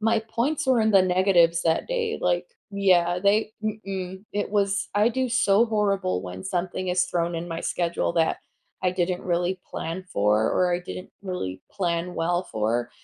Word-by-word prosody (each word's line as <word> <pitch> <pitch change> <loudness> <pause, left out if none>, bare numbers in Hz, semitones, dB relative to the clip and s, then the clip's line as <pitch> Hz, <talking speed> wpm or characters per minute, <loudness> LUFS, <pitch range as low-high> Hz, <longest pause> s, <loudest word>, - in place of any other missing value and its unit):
My 225 +1 +2
points 245 +7 -1
were 260 -3 +4
in 220 0 +3
the 195 -3 +6
negatives 180 -2 +3
that 165 -1 +1
day, 470 -2 -1
like - - +1 0.2
yeah, 180 -3 +3
they 205 +3 +2
hm-mm, 195 -3 -4
it 205 -1 -2
was 200 -1 +1
I 210 +2 +4
do 260 +1 -1
so 225 -3 +4
horrible 200 - 0
when 90 0 -7
something 185 +1 -2
is 180 0 +2
thrown 170 0 -1
in 165 +1 -4
my 165 -1 -4
schedule 170 -1 -1
that 165 -1 +2 0.4
I 185 - +2
didn't 180 0 -1
really 180 +1 0
plan 170 +3 -5
for, 105 +2 +2
or 180 -1 +2
I 175 - +1
didn't 180 +1 -8
really 140 - -4
plan 175 -1 -1
well 175 +2 0
for, 115 +3 0
185 Hz, 175 wpm, -25 LUFS, 170-205 Hz, 0.4 s, the